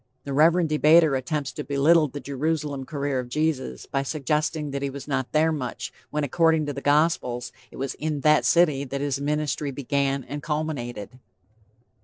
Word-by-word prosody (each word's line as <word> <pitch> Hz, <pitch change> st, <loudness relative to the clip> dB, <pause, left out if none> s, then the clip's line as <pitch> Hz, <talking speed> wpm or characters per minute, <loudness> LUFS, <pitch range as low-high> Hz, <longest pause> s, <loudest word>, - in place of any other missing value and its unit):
The 140 Hz, -, -5 dB
Reverend 165 Hz, +4 st, +4 dB
debater 155 Hz, 0 st, +5 dB
attempts 135 Hz, +1 st, -2 dB
to 150 Hz, -, -6 dB
belittle 150 Hz, +3 st, +3 dB
the 145 Hz, +1 st, -7 dB
Jerusalem 140 Hz, 0 st, -2 dB
career 140 Hz, -3 st, -2 dB
of 125 Hz, -1 st, -5 dB
Jesus, 140 Hz, -, -2 dB
by 135 Hz, -, -1 dB
suggesting 150 Hz, +1 st, -1 dB
that 140 Hz, 0 st, -3 dB
he 140 Hz, -, -1 dB
was 140 Hz, 0 st, -8 dB
not 135 Hz, -3 st, -2 dB
there 155 Hz, +1 st, +3 dB
much, 130 Hz, -6 st, -4 dB, 0.2 s
when 150 Hz, 0 st, -2 dB
according 160 Hz, +2 st, +2 dB
to 145 Hz, -, -3 dB
the 140 Hz, -, -6 dB
Gospels, 145 Hz, -5 st, +1 dB, 0.2 s
it -, -, -13 dB
was 135 Hz, 0 st, -3 dB
in 150 Hz, -2 st, -3 dB
that 150 Hz, +1 st, +4 dB
city 155 Hz, -5 st, +3 dB
that 140 Hz, 0 st, -4 dB
his 140 Hz, -1 st, -1 dB
ministry 150 Hz, 0 st, -1 dB
began 140 Hz, 0 st, -1 dB
and 145 Hz, +4 st, -6 dB
culminated. 130 Hz, -7 st, -4 dB
145 Hz, 175 wpm, -25 LUFS, 135-155 Hz, 0.2 s, debater